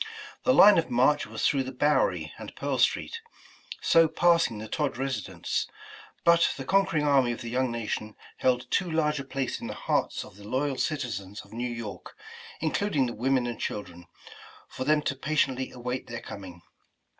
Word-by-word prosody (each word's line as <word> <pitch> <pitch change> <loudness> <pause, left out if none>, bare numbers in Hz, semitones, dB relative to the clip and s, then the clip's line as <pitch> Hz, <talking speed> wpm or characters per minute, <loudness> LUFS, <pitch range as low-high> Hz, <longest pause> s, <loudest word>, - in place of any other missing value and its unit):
The 255 - +5
line 205 -3 +8
of 165 - -2
march 130 +5 +3
was 110 +1 -3
through 140 - +2
the 130 0 -4
Bowery 145 +3 +1
and - - -9
Pearl - - -2
Street, 460 - +1 0.6
so 165 -1 +6
passing 170 -6 +3
the 110 +1 -6
Todd 145 +2 -1
residence, 135 0 -2 0.6
but 170 0 +5
the 135 - -6
conquering 190 -3 +2
army 135 -4 +4
of 120 - -8
the 115 -1 -6
young 130 +1 +1
nation 110 -2 -4 0.2
held 125 -1 +1
too 180 - +1
large 150 -2 +1
a - - -4
place 135 -1 -3
in - - -5
the - - -5
hearts - - -1
of - - -15
the 105 - -13
loyal 135 +3 -1
citizens 110 - -3
of - - -17
New 120 +2 -2
York, 115 -6 -7 0.4
including 155 -2 +1
the 120 - -3
women 130 +2 +1
and 120 -2 -4
children, 85 -4 -5 0.6
for 130 - -5
them 150 +1 +3
to 135 - -1
patiently 135 -2 0
await 125 +1 -4
their 115 -1 -6
coming. 90 -3 -9
130 Hz, 180 wpm, -28 LUFS, 115-150 Hz, 0.6 s, line